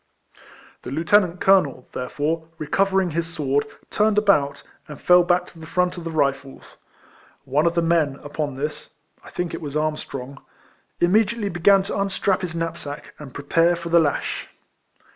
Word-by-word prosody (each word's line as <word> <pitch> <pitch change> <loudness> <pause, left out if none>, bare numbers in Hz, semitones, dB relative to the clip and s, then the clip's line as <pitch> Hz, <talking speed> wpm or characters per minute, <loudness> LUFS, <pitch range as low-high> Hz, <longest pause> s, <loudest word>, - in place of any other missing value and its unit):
The - - -8
lieutenant 175 +5 +2
colonel, 150 -10 +3
therefore, 155 +5 -2
recover 195 +6 +1
ing 175 - -3
his 165 +1 -2
sword, 145 -2 0 0.2
turned 210 0 +2
about, 145 -10 +2 0.2
and 150 - -9
full 180 0 +6
back 175 0 +2
to 170 - -15
the 160 - -10
front 180 +2 0
of 175 -2 -8
the - - -3
Rifles. 140 -3 -2 0.7
One 145 +4 +2
of 170 - 0
the 170 - +2
men, 165 -4 +2
upon 145 -1 -4
this 150 +3 -5 0.3
(I - - -12
think 175 -1 -4
it - - -5
was 150 -1 -4
Armstrong), 140 -3 -4 0.6
im 175 - +3
mediately 215 0 +2
began 190 +3 +4
to 200 - -4
unstrap 195 -1 0
his 175 -3 -4
knapsack, 165 -3 -5
and 145 -3 -9
prepare 165 +6 +2
for 170 0 -7
the 170 0 +5
lash. 150 -3 -1
165 Hz, 165 wpm, -22 LUFS, 145-180 Hz, 0.7 s, full